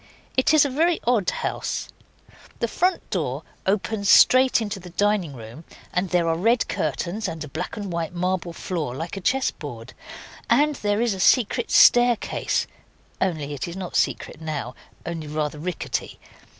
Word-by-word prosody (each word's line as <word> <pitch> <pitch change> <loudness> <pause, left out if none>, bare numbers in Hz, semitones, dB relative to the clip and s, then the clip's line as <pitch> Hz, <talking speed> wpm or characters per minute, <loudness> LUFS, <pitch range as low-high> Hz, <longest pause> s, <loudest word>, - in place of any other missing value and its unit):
It 260 - +3
is 310 -2 +6
a - - 0
very 330 +5 +2
odd 230 -6 +2
house: - - -3 0.7
the - - -1
front 365 +2 0
door - - -2 0.2
opens 200 +1 0
straight 255 0 +6
into 210 -3 -4
the 180 -1 -11
dining 195 -3 0
room, 115 +6 -10 0.3
and 180 +1 0
there 175 -1 +2
are 165 - +2
red 230 +8 +2
curtains 200 +5 -2
and 165 -3 -5
a - - -7
black 160 +9 -5
and 200 -4 -5
white 165 -2 -2
marble 180 0 -2
floor 165 -7 -4
like 165 +7 -5
a 195 - -6
chess 265 +8 +1
board, 125 -4 -9 0.6
and 295 +6 +4
there 205 +1 0
is 235 -3 +1
a 190 - -6
secret 240 +3 +3
staircase, 240 -2 +4 0.6
only 155 -6 -1
it 145 - -4
is 170 +2 -7
not 185 -2 -6
secret - - -1
now 150 -6 -4 0.3
only 165 -2 -5
rather 150 0 -3
rickety. 175 +1 -4
185 Hz, 165 wpm, -24 LUFS, 160-225 Hz, 0.7 s, is